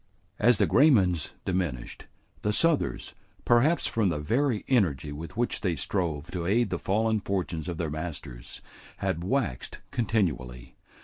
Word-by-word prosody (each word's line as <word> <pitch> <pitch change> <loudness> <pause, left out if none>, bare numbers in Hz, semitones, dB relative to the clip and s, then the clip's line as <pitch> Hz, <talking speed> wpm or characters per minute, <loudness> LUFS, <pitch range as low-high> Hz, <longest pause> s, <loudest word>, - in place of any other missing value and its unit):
As 120 +1 +5
the - - +4
Graymans 100 - +4
diminished, 85 -10 -3 0.3
the 105 - 0
Southers, 160 +8 +1 0.3
perhaps 135 +8 +4
from 110 -4 +1
the 80 - -1
very 115 - 0
energy 80 - +1
with 80 +8 -8
which 120 0 -1
they 90 -4 0
strove 80 0 -2
to 85 -2 -3
aid 115 +2 +2
the 90 - -1
fallen 110 +2 +1
fortunes 90 -5 -3
of 85 -2 -4
their 80 -3 -2
masters, 75 -7 -7 0.4
had 85 - -2
waxed 110 - -2
continually. 75 - -1
90 Hz, 140 wpm, -28 LUFS, 80-115 Hz, 0.4 s, As